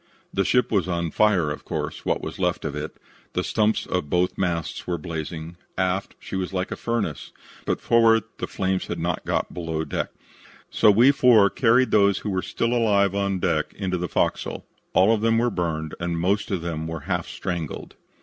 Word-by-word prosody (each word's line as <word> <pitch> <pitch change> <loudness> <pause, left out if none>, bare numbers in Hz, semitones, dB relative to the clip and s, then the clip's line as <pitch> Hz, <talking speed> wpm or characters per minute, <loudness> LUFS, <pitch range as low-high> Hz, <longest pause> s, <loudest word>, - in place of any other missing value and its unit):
"The 95 - +2
ship 125 +5 +2
was 100 -5 +2
on 85 -2 -1
fire, 95 -8 +3
of 75 - -6
course, - - -4
what - - 0
was - - -6
left - - 0
of - - -3
it. 75 +1 -5 0.4
The 90 - 0
stumps 110 +2 +1
of 90 -5 -2
both 90 +2 +1
masts 85 -4 -2
were 90 -1 -1
blazing. 80 +1 -6 0.2
Aft 95 +1 -1
she - - -7
was 95 -1 -2
like 95 -1 -2
a - - -2
furnace, 110 - -3 0.4
but - - 0
forward 115 -2 +4 0.2
the - - -3
flames 95 -1 -1
had 85 - -3
not 85 +1 -2
got - - -1
below 80 -2 -3
deck, - - -2 0.6
so - - +5
we 115 +7 +6
four 120 -8 +5
carried 125 +1 +3
those 100 -2 +4
who 105 - -1
were 95 -1 0
still 115 +5 -1
alive 100 -5 +3
on 100 -1 0
deck 85 -4 -1
into 90 -3 -2
the 90 -1 -3
fo'c's'l. - - -1 0.3
All 95 +5 +5
of 110 - 0
them 115 0 +3
were 120 +1 +2
burned 80 -4 -2
and 85 -1 -2
most 100 +6 +1
of 95 -5 -2
them 80 -2 -3
were 80 -1 -5
half 90 +1 -2
strangled. 85 -5 -5
95 Hz, 200 wpm, -24 LUFS, 85-105 Hz, 0.6 s, we